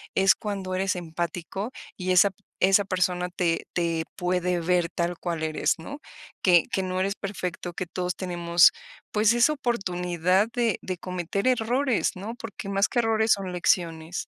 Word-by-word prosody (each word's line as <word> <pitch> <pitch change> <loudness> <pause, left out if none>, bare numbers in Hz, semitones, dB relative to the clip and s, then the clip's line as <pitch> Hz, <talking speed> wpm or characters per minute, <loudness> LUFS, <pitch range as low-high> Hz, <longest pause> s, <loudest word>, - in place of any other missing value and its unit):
es 195 0 +5
cuando 195 -3 -4
eres 190 0 0
empático, 175 +5 -4 0.3
y 185 0 -2
esa 185 +2 +6
p 195 +1 -24 0.2
esa 195 +2 +5
persona 180 -1 0
te 170 -2 0
te 170 -2 0
puede 180 0 0
ver 175 0 +1
tal 175 0 -1
cual 170 -2 -3
eres, 160 +1 0
¿no? 280 - -8 0.4
Que 175 -3 +6
que 190 - 0
no 185 0 -2
eres 195 +1 0
perfecto, 185 -3 -5
que 180 - -4
todos 180 +1 -3
tenemos, 175 -2 +4 0.4
pues, 215 +1 +4
esa 240 +6 +4
oportunidad 185 - 0
de 235 -3 +1
de 185 -2 -4
cometer 185 +4 -3
errores, 250 +1 +1
¿no? 205 +5 -6
Porque 225 -4 -7
más 195 0 +2
que 245 - 0
errores 225 -1 +2
son 195 -2 -4
lecciones. 170 -1 0
185 Hz, 165 wpm, -26 LUFS, 175-200 Hz, 0.4 s, esa